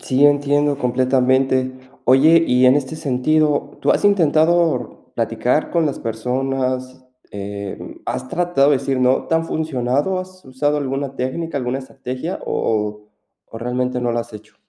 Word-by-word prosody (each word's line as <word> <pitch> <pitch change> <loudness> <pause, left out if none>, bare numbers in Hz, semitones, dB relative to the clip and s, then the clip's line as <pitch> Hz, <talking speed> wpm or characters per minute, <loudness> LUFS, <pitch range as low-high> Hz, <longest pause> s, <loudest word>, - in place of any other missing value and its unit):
Sí, 135 +2 +2
entiendo 145 0 +2
completamente. 130 0 +1 0.3
Oye, 155 +6 +5
y 125 +1 +4
en 130 - +6
este 145 +2 -3
sentido, 150 +2 0
¿tú - - +1
has - - +1
intentado 160 - +2
platicar 115 +5 0
con 165 -2 +1
las 140 - -3
personas? 130 +2 -3 0.3
Em, 100 0 -7
¿has 130 - -4
tratado 170 -5 +2
de 140 - +3
decir 135 -1 -2
no? 130 +1 +2
¿Te - - 0
han 165 0 +1
funcionado, 145 +3 -1
has 185 0 -9
usado 145 +3 -1
alguna 135 -1 -3
técnica, 145 +5 -3
alguna 125 0 -2
estrategia, 135 +5 -6
o 105 -1 -1 0.5
o 115 - -9
realmente 125 +1 -2
no 120 -1 0
la 120 - 0
has 120 0 -10
hecho? 105 0 -12
130 Hz, 150 wpm, -20 LUFS, 125-150 Hz, 0.5 s, en